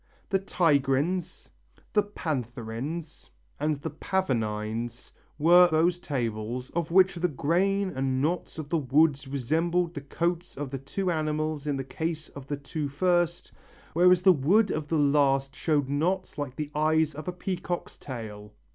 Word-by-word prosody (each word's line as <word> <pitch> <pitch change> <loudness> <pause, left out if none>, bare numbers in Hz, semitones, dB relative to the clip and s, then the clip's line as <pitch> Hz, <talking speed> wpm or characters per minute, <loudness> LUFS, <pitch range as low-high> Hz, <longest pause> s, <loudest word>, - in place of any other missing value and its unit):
The 195 - +2
tigrines, 165 -1 0 0.4
the 210 - +5
pantherines 140 - -5 0.3
and 150 +1 +1
the 140 - -6
pavonines 115 - -2 0.3
were 175 +4 +7
those 170 +2 +2
tables 120 -4 -3
of 170 -1 -2
which 190 +2 +5
the 175 0 0
grain 185 +6 +1
and 130 0 0
knots 165 +6 -1
of 155 -3 -6
the 165 - +1
wood 145 +1 +3
resembled 165 +6 0
the 145 - -5
coats 170 +4 -2
of 140 -2 -4
the 135 - -4
two 180 +7 -2
animals 155 -1 -1
in 145 -2 0
the 135 - -3
case 160 +3 -4
of 140 -1 -11
the 145 - -2
two 145 +1 -4
first, 175 +3 +1 0.4
whereas 180 +1 +5
the 190 -1 +8
wood 185 +9 +3
of 155 -1 -2
the 160 - 0
last 140 -2 +2
showed 150 -4 +1
knots 175 +7 -1
like 140 -3 -4
the 150 0 -4
eyes 155 0 +2
of 155 +3 -8
a - - 0
peacock's 180 0 -4
tail. 105 -5 -8
155 Hz, 155 wpm, -27 LUFS, 135-175 Hz, 0.4 s, the